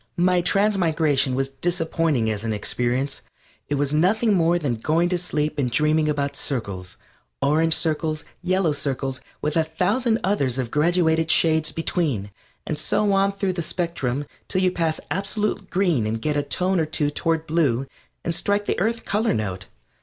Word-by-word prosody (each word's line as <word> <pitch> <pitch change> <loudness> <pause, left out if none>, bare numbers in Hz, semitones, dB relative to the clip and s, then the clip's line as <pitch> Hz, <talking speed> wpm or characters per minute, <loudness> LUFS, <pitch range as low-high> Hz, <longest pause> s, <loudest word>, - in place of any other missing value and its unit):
My 180 0 +3
transmigration 165 -9 +2
was 135 +1 0
disappointing 160 -3 0
as 105 0 -4
an 115 -1 -1
experience. 125 +6 -1 0.5
It 145 - +1
was 145 0 0
nothing 210 +8 +3
more 170 -1 +3
than 140 -8 -1
going 165 +9 +1
to 180 - +1
sleep 150 -4 -2
and 130 -3 +1
dreaming 150 +4 +2
about 140 -1 -1
circles 100 - -4 0.4
orange 160 +3 +2
circles, 155 -1 -1 0.2
yellow 185 -2 +1
circles, 135 -2 -2 0.2
with 150 - -1
a 165 - +4
thousand 205 +9 +1
others 140 -11 +1
of 125 -3 -2
graduated 160 0 +2
shades 160 -1 +3
between, 145 - -1 0.3
and 150 - -2
so 205 +5 +1
on 195 0 +3
through 195 -1 -1
the 175 - -2
spectrum 145 -6 -2 0.2
till 185 - 0
you 185 - +3
pass 165 -3 -1
absolute 200 0 -2
green 175 - +1
and 110 +1 -2
get 150 -1 0
a 145 - +2
tone 180 +5 0
or 160 - 0
two 145 -1 0
toward 165 +1 -1
blue 145 -6 +1 0.4
and 170 - +1
strike 205 +4 +1
the - - -1
Earth 230 +4 -1
color 215 - +1
note. 95 -4 -3
160 Hz, 170 wpm, -23 LUFS, 140-180 Hz, 0.5 s, a